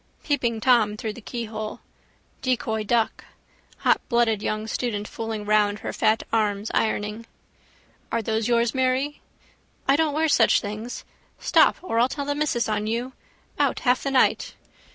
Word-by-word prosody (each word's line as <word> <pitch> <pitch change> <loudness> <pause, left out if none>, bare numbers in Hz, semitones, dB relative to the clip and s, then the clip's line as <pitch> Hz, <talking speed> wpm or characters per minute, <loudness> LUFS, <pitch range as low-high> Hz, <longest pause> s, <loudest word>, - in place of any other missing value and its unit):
Peeping 240 -6 0
Tom 220 -4 +3
through 215 0 -4
the 240 - -11
keyhole. 215 -2 -5 0.6
Decoy 225 -4 -1
duck. 225 +1 0 0.6
Hotblooded 235 -4 +2
young 215 0 -2
student 215 -2 -2
fooling 225 -2 -5
round 210 -1 +3
her - - -4
fat 220 +1 +2
arms 210 -1 0
ironing. 215 +1 -1 0.8
—Are 230 -1 0
those 220 0 0
yours, 235 -1 +2
Mary? 260 +3 0 0.7
—I 275 - +5
don't 310 -1 +1
wear 320 +1 +2
such 295 - +4
things... 215 +4 -6 0.3
Stop - - +4
or 230 -11 0
I'll 245 +2 +4
tell 285 0 -4
the 285 - 0
missus 285 -5 0
on 210 -1 -1
you. 240 +4 -2 0.5
Out - - +1
half 250 -1 +2
the 275 - -2
night. 270 -1 +2
230 Hz, 150 wpm, -24 LUFS, 215-255 Hz, 0.8 s, I